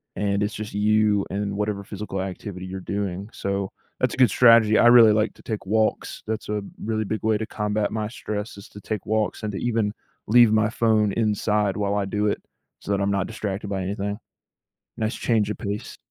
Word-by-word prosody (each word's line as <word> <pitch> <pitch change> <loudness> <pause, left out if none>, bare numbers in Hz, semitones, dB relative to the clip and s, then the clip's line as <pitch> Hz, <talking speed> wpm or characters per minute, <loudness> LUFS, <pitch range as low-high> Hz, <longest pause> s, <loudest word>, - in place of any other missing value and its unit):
and 100 0 0
it's 105 +1 -2
just 105 -1 -6
you 105 0 +3
and 100 +1 -2
whatever 105 -1 -2
physical 100 -1 -5
activity 95 0 -6
you're 95 +1 -6
doing, 100 +1 -4
so, 100 -1 -2 0.3
that's - - +1
a - - -6
good 130 -3 +6
strategy. 115 -1 +6
I - - +6
really 120 -3 +8
like 110 +1 +1
to - - -17
take 105 -3 -4
walks, 110 +2 0
that's 110 -1 -4
a 105 0 -1 0.2
really 110 0 -1
big 110 +2 -3
way 110 -1 +2
to 110 - -3
combat 105 -1 -1
my 110 -1 -2
stress, 105 -2 -5
is 100 - -11
to 105 - -12
take 105 -1 -4
walks, 110 0 -1
and 105 - -2
to - - -3
even 115 -4 0 0.3
leave 120 0 +6
my 110 0 +3
phone 110 -2 +2
inside 105 -2 +1
while 100 -1 0
I 100 -1 0
do 105 +2 -1
it, 105 - -1 0.4
so - - -11
that 100 0 +1
I'm 100 0 +1
not 100 -1 0
distracted 105 -2 -4
by 95 -1 -2
anything. 100 +2 -3 0.8
Nice 110 0 -1
change 110 -3 +1
of - - -4
pace. 105 -1 -5
105 Hz, 210 wpm, -24 LUFS, 100-110 Hz, 0.8 s, really